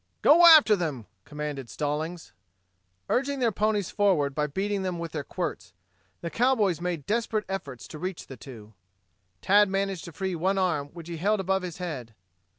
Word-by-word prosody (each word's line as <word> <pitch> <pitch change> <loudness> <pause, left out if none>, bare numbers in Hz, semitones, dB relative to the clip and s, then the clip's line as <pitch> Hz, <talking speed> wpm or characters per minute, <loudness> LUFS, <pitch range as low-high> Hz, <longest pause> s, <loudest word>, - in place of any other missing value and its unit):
"Go 340 +3 +8
after 310 -10 +8
them!" 150 - -3 0.2
commanded 150 -4 -5
Stallings. 155 +3 -4 0.7
Urging 275 +2 0
their 240 -3 +1
ponies 210 -2 0
forward 175 -9 +2
by 150 +1 0
beating 195 +6 -2
them 185 -2 -2
with 170 -1 -5
their 150 -3 -4
quirts, - - -5 0.5
the 170 - -5
cowboys 225 -9 +2
made 175 -5 -3
desperate 220 -1 -1
efforts 145 -10 -6
to 155 - -9
reach 185 +1 -5
the 135 - -10
two. 110 -4 -12 0.7
Tad 205 +1 +5
managed 195 -2 -2
to 170 - -8
free 190 +4 -3
one 185 +4 0
arm 165 -7 0
which 165 +2 -11
he 170 -1 -5
held 205 +5 +1
above 190 0 0
his 180 -2 -6
head. 135 - -6
180 Hz, 170 wpm, -27 LUFS, 150-205 Hz, 0.7 s, Go